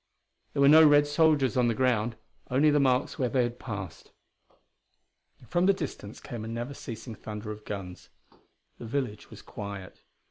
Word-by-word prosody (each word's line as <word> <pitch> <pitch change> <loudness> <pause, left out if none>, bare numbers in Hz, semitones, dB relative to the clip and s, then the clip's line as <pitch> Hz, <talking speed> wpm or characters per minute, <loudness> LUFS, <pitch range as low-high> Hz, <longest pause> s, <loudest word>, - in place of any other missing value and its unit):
There 140 - +2
were - - +7
no 155 +2 +8
Red 145 -1 +6
soldiers 145 -4 +2
on 125 -2 +3
the 115 - +1
ground 120 -3 +1 0.3
only 145 +4 +4
the 145 - +3
marks 130 -2 +1
where 125 -2 +1
they 125 +1 +2
had 120 0 -4
passed. 95 -8 -7 1.4
From 175 +1 +1
the 195 - +6
distance 145 - -7
came 115 -3 -7
a - - -6
never 120 +4 -4
ceasing 115 -2 -8
thunder 105 0 -7
of 105 0 -9
guns. 95 -3 -7 0.7
The 115 - -7
village 120 -4 -3
was - - -12
quiet. 100 -2 -8
120 Hz, 170 wpm, -28 LUFS, 105-140 Hz, 1.4 s, no